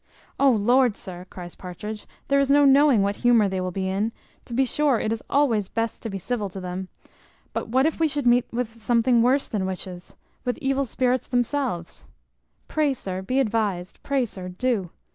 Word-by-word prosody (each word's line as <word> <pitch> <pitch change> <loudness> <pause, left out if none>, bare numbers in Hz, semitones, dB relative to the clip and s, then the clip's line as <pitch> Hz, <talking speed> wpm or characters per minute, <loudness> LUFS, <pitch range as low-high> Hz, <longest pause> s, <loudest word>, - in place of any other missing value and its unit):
"O 275 - +6
Lord, 240 +1 +3
sir," 180 0 -9
cries 175 -2 -9
Partridge, 210 +4 -8 0.2
"there 280 0 +3
is 275 -1 +2
no 285 +1 +6
knowing 275 -5 +5
what 200 +1 -1
humour 235 -4 +4
they 190 -1 -2
will 185 - -2
be 190 +1 -3
in; 200 +4 0 0.3
to 240 - -9
be 265 +2 +3
sure 280 -2 +2
it 220 - 0
is 225 - -5
always 230 -9 +2
best 225 -1 -2
to 225 - -4
be 195 - -4
civil 205 +2 -3
to 190 - -8
them; 185 +1 -5 0.7
but - - -3
what 260 +4 +2
if 320 - 0
we 325 - +4
should 290 -2 -2
meet 245 0 +3
with 230 -1 -4
something 235 +1 +3
worse 260 +4 +3
than 195 -4 -2
witches, 185 -1 -7 0.3
with 245 -2 -1
evil 275 -2 0
spirits 255 +1 0
themselves? 245 - -2 0.6
Pray, 300 -3 +1
sir, 190 -5 -5
be 255 +8 0
advised; 210 -7 -1
pray, 275 -3 0
sir, 185 -4 -7
do. 195 -1 -1
230 Hz, 195 wpm, -24 LUFS, 190-265 Hz, 0.7 s, O